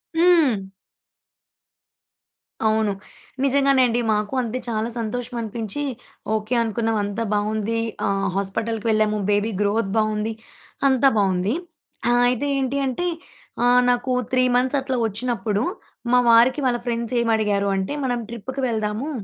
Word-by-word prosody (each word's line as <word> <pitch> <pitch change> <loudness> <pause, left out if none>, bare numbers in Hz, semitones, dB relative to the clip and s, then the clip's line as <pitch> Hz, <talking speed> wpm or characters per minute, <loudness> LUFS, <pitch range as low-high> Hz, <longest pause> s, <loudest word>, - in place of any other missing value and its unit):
హ్మ్. 325 - +4 2.0
అవును. 220 -1 +2 0.5
నిజంగానే 275 -1 +3
అండి. 235 +1 0
మాకు 210 +3 -2
అంతే. 240 +1 -3
చాలా 220 +1 -1
సంతోషమనిపించి, 230 +1 -4 0.5
ఓకే 215 +3 -2
అనుకున్నాం. 225 0 -1
అంతా 205 +3 -2
బావుంది. 215 +2 -1 0.3
ఆహ్, 195 0 0
హాస్పిటల్‌కి 215 +3 -2
వెళ్ళాము. 215 -1 +2
బేబీ 205 +2 +1
గ్రోత్ 205 0 +1
బావుంది. 215 0 0 0.5
అంతా 270 +1 +4
బావుంది. 190 +2 +1 0.6
ఆహ్, 240 0 +4
అయితే 250 +3 -1
ఏంటి 265 +1 -1
అంటే, 270 +8 -1 0.6
ఆహ్, 245 0 +5
నాకూ 245 +1 +1 0.2
3 255 0 +3
మంత్సట్లా 260 0 0
ఒచ్చినప్పుడు, 215 -1 -2 0.5
మా 250 - +7
వారికి 240 +5 +5
వాళ్ళ 240 -1 +1
ఫ్రెండ్సేమడిగారు 225 -4 0
అంటే, 190 +8 -2
మనం 245 -2 -1
ట్రిప్పుకి 255 +4 -5
వెళ్దాము 220 +5 -2
230 Hz, 115 wpm, -22 LUFS, 210-250 Hz, 2.0 s, మా